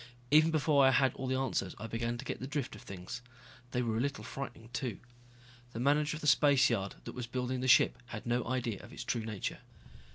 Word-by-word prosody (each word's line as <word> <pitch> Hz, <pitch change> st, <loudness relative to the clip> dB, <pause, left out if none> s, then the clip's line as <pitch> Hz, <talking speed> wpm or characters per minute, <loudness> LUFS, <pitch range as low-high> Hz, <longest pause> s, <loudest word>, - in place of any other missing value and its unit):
Even 155 Hz, +2 st, +7 dB
before 150 Hz, -3 st, +3 dB
I 135 Hz, -, +7 dB
had 135 Hz, -1 st, +3 dB
all 130 Hz, -, -5 dB
the 130 Hz, -, +1 dB
answers 130 Hz, -8 st, -1 dB
I 105 Hz, -, -6 dB
began 115 Hz, +1 st, -2 dB
to -, -, -8 dB
get -, -, -4 dB
the 130 Hz, -, -5 dB
drift 145 Hz, -3 st, -3 dB
of -, -, -11 dB
things. 95 Hz, +4 st, -7 dB, 0.5 s
They 125 Hz, 0 st, 0 dB
were 110 Hz, -2 st, 0 dB
a -, -, +1 dB
little 140 Hz, +3 st, -2 dB
frightening, 120 Hz, -4 st, -7 dB
too. 120 Hz, -4 st, -2 dB, 0.8 s
The 115 Hz, -, -4 dB
manager 145 Hz, +3 st, +2 dB
of -, -, -10 dB
the -, -, -5 dB
spaceyard 130 Hz, -9 st, +4 dB
that -, -, -7 dB
was 125 Hz, -2 st, -5 dB
building 125 Hz, +1 st, -2 dB
the 130 Hz, -, -1 dB
ship 130 Hz, -, +5 dB
had 115 Hz, -2 st, -7 dB
no 120 Hz, 0 st, +1 dB
idea 120 Hz, -4 st, -2 dB
of -, -, -12 dB
its -, -, -6 dB
true 115 Hz, -, -1 dB
nature. 110 Hz, -3 st, -4 dB
125 Hz, 225 wpm, -32 LUFS, 115-135 Hz, 0.8 s, Even